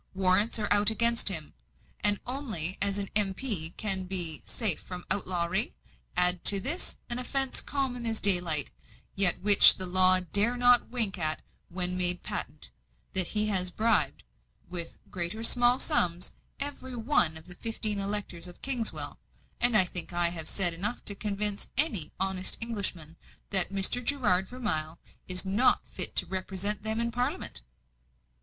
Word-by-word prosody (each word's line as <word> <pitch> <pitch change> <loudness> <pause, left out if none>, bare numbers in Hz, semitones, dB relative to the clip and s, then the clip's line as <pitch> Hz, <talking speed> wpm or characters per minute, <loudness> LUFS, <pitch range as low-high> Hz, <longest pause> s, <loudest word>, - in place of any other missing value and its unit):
Warrants 190 +4 +2
are 210 -2 -3
out 205 +1 +2
against 235 0 +3
him; 160 -6 -3 0.5
and 205 -1 +1
only 225 - +1
as 200 0 0
an 200 -1 -4
M.P. 195 -4 +1
can 195 -3 0
he - - -6
be 175 -4 +2
safe 215 -8 +1
from 180 -1 -10
outlawry. 185 +2 -2 0.4
Add 180 0 +4
to 200 - +6
this, 305 - -1
an 240 0 -2
offence 270 +1 -2
common 255 -4 -4
as 225 -1 -2
daylight, 175 -7 +5 0.4
yet 195 -3 +3
which 205 0 +7
the 185 - -3
law 185 0 +4
dare 205 +7 +1
not 245 0 +3
wink 225 -7 +3
at 155 -1 -2 0.3
when 180 0 -2
made 180 0 +2
patent 155 - -7 0.4
that 185 -2 +4
he 210 0 0
has 185 -3 +1
bribed, 180 - 0 0.4
with 170 -2 -4
great 175 0 -2
or 225 - -8
small 245 +1 +3
sums, 180 - 0 0.3
every 275 -2 -6
one 225 - 0
of 160 - -14
the 180 - -10
fifteen 215 0 -4
electors 195 -3 -4
of 175 - -14
Kingswell; 250 -4 -3 0.4
and 240 -2 +3
I 190 - +5
think 180 -1 -1
I 175 0 +1
have 165 -2 -6
said 175 -4 +4
enough 205 +8 -4
to 205 - -2
convince 205 0 -1
any 225 - 0
honest 190 -1 -1
Englishman 185 -8 -4 0.3
that 190 -2 +4
Mr. 200 +5 +2
Gerard 205 -9 -1
Vermilye 165 -11 -2 0.3
is 180 +1 +1
not 205 +7 0
fit - - +1
to - - +2
represent 190 +2 -3
them 220 +1 -4
in 235 0 -2
Parliament." 245 - -3
195 Hz, 160 wpm, -27 LUFS, 180-230 Hz, 0.5 s, which